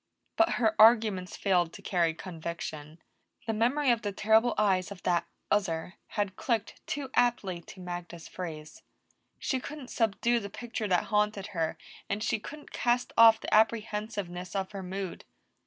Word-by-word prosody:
But 335 - +3
her 220 -3 +2
arguments 215 -5 +5
failed 175 -4 +2
to 200 - -11
carry 170 -4 +1
conviction. 160 -3 -6 0.5
The 225 - -1
memory 250 +5 +2
of 235 -1 +1
the 205 - -2
terrible 220 +4 +3
eyes 190 -3 +2
of 200 -3 -10
that 170 -1 +1 0.2
other 180 -4 0 0.2
had 200 -2 0
clicked 225 -2 -2
too 275 -2 -4
aptly 210 -8 +1
to 185 - -13
Magda's 175 -2 -7
phrase. 155 -4 -7 0.6
She 260 - -1
couldn't 280 -1 -8
subdue 235 +1 +1
the 200 -2 -6
picture 230 0 -4
that 180 -2 +2
haunted 210 -1 +2
her, 165 -3 -1 0.3
and 205 +2 -1
she 220 - 0
couldn't 295 +7 -10
cast 245 0 0
off 225 -1 +8
the - - -3
apprehensiveness 210 -4 0
of 190 -1 -2
her 200 -2 -6
mood. 190 0 -5
205 Hz, 155 wpm, -29 LUFS, 180-225 Hz, 0.6 s, off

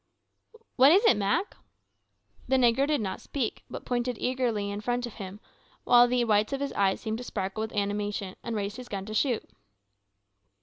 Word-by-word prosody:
"What 270 +3 +7
is't, 390 - +5
Mak?" 200 - 0 0.9
The 265 - +2
negro 255 +2 +3
did 295 -4 +1
not 190 -3 -4
speak, 260 -6 -3
but - - -8
pointed 245 -1 -1
eagerly 235 -6 -1
in 205 +1 -5
front 245 +2 -1
of 240 - -8
him, 195 -1 -8 0.4
while 245 0 +6
the 245 0 +1
whites 215 +1 +2
of 275 - -1
his 280 0 -3
eyes 195 -1 +1
seemed 220 +1 -3
to - - -6
sparkle 195 -2 -4
with 220 - -3
animation, 205 -1 -2
and 230 - -3
raised 205 +1 -3
his 250 -1 -9
gun 195 -1 -4
to 215 - -7
shoot. 240 +1 0
225 Hz, 180 wpm, -28 LUFS, 205-250 Hz, 0.9 s, What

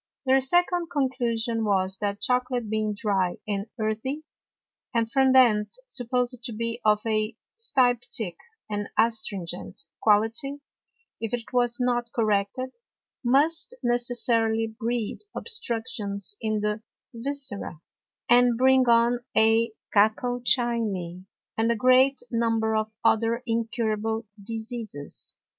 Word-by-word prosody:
Their 265 0 +4
second 350 +4 +1
Conclusion 240 -6 -1
was, 190 -2 +1
That 205 -1 -2
Chocolate 250 -2 0
being 215 -1 0
dry 195 -4 0
and 200 0 -2
earthy, 220 +8 -2 0.7
and 230 -1 +1
from 265 0 +4
thence 240 - +4
supposed 250 - -1
to 240 - -3
be 230 +2 -3
of 210 -1 +3
a 215 0 0 0.2
styptick 245 - +1 0.3
and 205 -1 -3
astringent 205 -7 -1 0.2
Quality; 225 +7 +2 0.6
if 225 +1 -2
it 240 +1 -10
was 245 -1 +2
not 240 -1 0
corrected, 215 +3 -1 0.5
must 305 - +3
necessarily 240 -2 +2
breed 225 0 -3 0.2
Obstructions 225 - -3
in 215 -2 -1
the 210 +1 -1 0.3
Viscera, 235 - -4 0.5
and 245 -1 +5
bring 260 0 +4
on 235 +1 +4 0.2
a 225 +1 +4 0.2
Cacochimy, 220 -4 +1 0.3
and 225 +1 +2
a - - +1
great 255 +4 +4
Number 225 -1 +1
of 215 0 0 0.2
other 230 +2 +2
incurable 225 -1 -1 0.2
Diseases. 225 - -6
230 Hz, 110 wpm, -26 LUFS, 215-250 Hz, 0.7 s, and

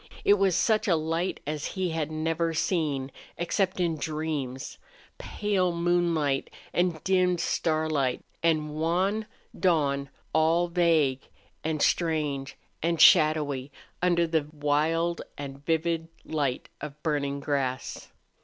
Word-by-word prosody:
It 200 - +7
was 195 -3 +3
such 220 +3 +2
a 175 - +4
light 165 +3 -1
as 150 0 -3
he 185 -2 0
had 160 -2 -2
never 165 +1 -1
seen, 145 -6 0 0.3
except 185 +2 0
in 170 -3 +1
dreams. 150 -4 -4 0.4
Pale 190 -4 0
moonlight 170 -5 +1 0.2
and 175 -3 0
dimmed 180 -2 +2
starlight 155 -6 0 0.2
and 155 -2 +1
wan 185 +7 0 0.3
dawn 140 -6 +1 0.2
all 165 +3 +3
vague 160 -6 +2 0.4
and 155 -1 0
strange 150 -5 0 0.2
and 170 0 0
shadowy 150 -6 +5 0.3
under 175 -1 +3
the 160 -3 0
wild 155 +3 0 0.2
and 140 -1 -7
vivid 165 +1 0 0.2
light 145 -5 -1
of 150 +1 -8
burning 140 -3 -1
grass. 135 -3 -2
160 Hz, 115 wpm, -27 LUFS, 145-170 Hz, 0.4 s, It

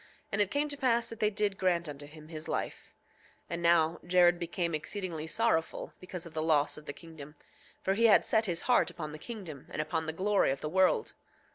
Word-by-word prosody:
And 200 - +1
it 200 - +3
came 290 +5 0
to 285 - -1
pass 235 -3 +1
that 230 - -8
they 210 - +3
did 205 -1 -1
grant 175 -3 +1
unto 145 -1 -8
him 155 +1 -13
his 155 -1 -6
life. - - -4 0.5
8:7 - - -40
And 170 0 -3
now 170 -1 +3
Jared 175 0 +4
became 170 0 -2
exceedingly 165 0 -4
sorrowful 165 -5 0
because 180 -2 -7
of 165 - -11
the 155 - -1
loss 155 -2 +2
of 150 - -11
the - - -2
kingdom, 155 -2 -11 0.5
for 190 - +2
he 230 +4 +3
had 215 - +6
set 220 -1 +2
his 170 -2 0
heart 250 - +3
upon 155 -3 -6
the 155 - -8
kingdom 180 - -8
and - - -6
upon 160 +1 -1
the 160 - -1
glory 200 -2 +3
of 135 0 -2
the 150 - -3
world. 185 +2 +2
170 Hz, 225 wpm, -31 LUFS, 155-200 Hz, 0.5 s, had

